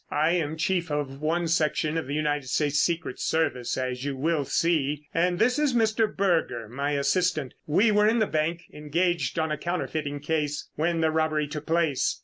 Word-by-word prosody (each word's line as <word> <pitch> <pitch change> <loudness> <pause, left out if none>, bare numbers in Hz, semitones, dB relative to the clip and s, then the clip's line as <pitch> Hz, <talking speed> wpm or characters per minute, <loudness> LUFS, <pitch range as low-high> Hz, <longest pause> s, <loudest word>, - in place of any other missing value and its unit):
"I 155 +2 +2
am 160 -3 -1
chief 170 +1 0
of 145 -2 -3
one 165 +2 0
section 155 -1 +1
of 165 -4 -2
the 140 - -3
United 150 -3 -1
States 145 +1 +1
Secret 165 -6 -1
Service 155 -7 0
as 130 -1 -3
you 140 -1 -2
will 155 +1 0
see, 150 -3 0
and 175 +1 +1
this 245 +7 +2
is 290 -4 +1
Mr. 225 -1 +3
Berger, 165 - 0
my 140 +6 -2
assistant. 150 0 0
We 200 +9 +4
were 210 0 +4
in 225 +2 +3
the 220 - +3
bank, 165 0 -1
engaged 155 0 -1
on 160 -1 0
a 150 - -2
counterfeiting 155 -4 -3
case, 150 -1 -2
when 165 +2 0
the 160 0 +2
robbery 155 -1 +1
took 150 +1 -7
place. 165 -4 +1
155 Hz, 185 wpm, -26 LUFS, 145-170 Hz, -, We